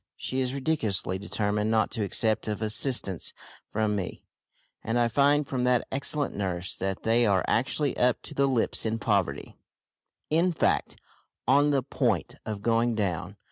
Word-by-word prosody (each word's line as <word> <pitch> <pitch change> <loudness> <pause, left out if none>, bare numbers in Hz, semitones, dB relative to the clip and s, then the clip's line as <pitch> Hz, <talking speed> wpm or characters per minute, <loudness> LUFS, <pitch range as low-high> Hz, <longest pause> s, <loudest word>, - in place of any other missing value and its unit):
She 130 - -3
is 130 +1 -1
ridiculously 110 - 0
determined 105 +1 -1
not 110 -2 +2
to 110 - -2
accept 110 +2 +1
of 105 0 -2
assistance 110 - 0 0.4
from 105 -1 0
me, 95 -2 -5 0.6
and 115 +2 -1
I 120 -1 +3
find 145 +4 +3
from 130 -2 -2
that 125 -1 +2
excellent 140 +2 0
nurse 90 -3 -2
that 95 0 -3
they 115 +1 +3
are 95 -2 +2
actually 135 +3 0
up 125 -1 +2
to - - -8
the 140 0 +2
lips 125 -4 +1
in 110 0 -1
poverty 100 -10 -1 0.7
in 170 +3 +3
fact, - - 0 0.5
on 145 +3 +4
the 140 -3 +1
point 120 - -1
of 105 -2 -4
going 115 +1 +2
down. 95 -2 -2
115 Hz, 160 wpm, -27 LUFS, 100-130 Hz, 0.7 s, on